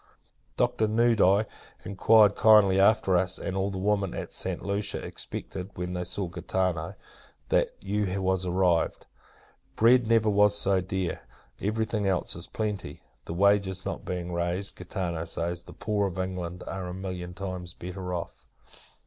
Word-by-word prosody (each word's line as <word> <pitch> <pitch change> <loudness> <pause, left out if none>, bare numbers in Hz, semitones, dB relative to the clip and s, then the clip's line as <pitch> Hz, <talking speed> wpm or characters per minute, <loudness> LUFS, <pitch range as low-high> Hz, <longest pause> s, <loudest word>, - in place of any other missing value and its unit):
Doctor 110 - +2
Nudi 110 -2 +4 0.4
inquired 105 +1 +5
kindly 105 -3 +6
after 100 -2 +4
us; 90 +1 +1
and 95 - -4
all 95 +1 0
the 95 - -5
women 100 -1 0
at - - -6
Santa - - -3
Lucia 100 +1 -1
expected, 90 +1 -5
when 90 0 -4
they 90 0 -2
saw 90 +2 -2
Gaetano, 85 -1 -2 0.5
that - - +2
you 100 -1 -1
was 95 -1 0
arrived. 90 -1 +1 0.7
Bread 120 +1 +5
never 115 -1 +3
was 105 0 +4
so 95 -2 +2
dear; 95 -2 -3 0.4
every 110 +2 0
thing 105 -2 -1
else 95 -2 0
in 85 - -5
plenty. 105 -4 -4 0.2
The 85 - -5
wages 100 -1 +2
not - - -4
being 90 -1 -4
raised, 85 +3 -1
Gaetano 90 -2 -4
says, 85 +1 -3
the - - -11
poor 105 -2 -1
of 95 -1 -7
England 90 -1 -4
are 95 -1 -5
a 90 - -6
million 90 -2 -6
times 90 -2 -6
better 90 +1 -6
off. 85 -2 -6
95 Hz, 155 wpm, -27 LUFS, 90-100 Hz, 0.7 s, kindly